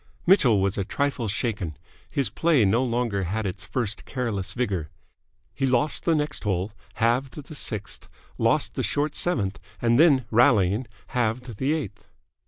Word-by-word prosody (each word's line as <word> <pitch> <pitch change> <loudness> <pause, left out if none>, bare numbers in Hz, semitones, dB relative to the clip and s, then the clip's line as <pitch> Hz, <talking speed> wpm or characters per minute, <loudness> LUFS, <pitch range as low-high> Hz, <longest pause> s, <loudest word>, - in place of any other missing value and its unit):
Mitchell 135 - +5
was 100 +1 0
a - - +1
trifle 140 +2 -1
shaken. 100 -7 -2 0.3
His 140 -4 -1
play 160 -9 +3
no 115 +6 +3
longer 115 -6 -1
had 105 +5 -2
its 95 0 -4
first 115 -5 -2
careless 115 -7 -3
vigour. 95 -11 -2 0.6
He 135 - 0
lost 130 +4 +1
the 165 - +3
next 150 0 -1
hole, 95 -1 -1 0.2
halved 120 +3 +1
the 150 +1 -9
sixth, 110 -8 -5 0.3
lost - - +2
the - - -2
short 145 +1 -1
seventh, 100 - +1 0.2
and 120 +1 +3
then, 145 -7 +5
rallying, 115 -2 +4 0.2
halved 120 -1 -2
the 135 +6 +1
eighth. 155 -11 -5
120 Hz, 155 wpm, -25 LUFS, 100-135 Hz, 0.6 s, Mitchell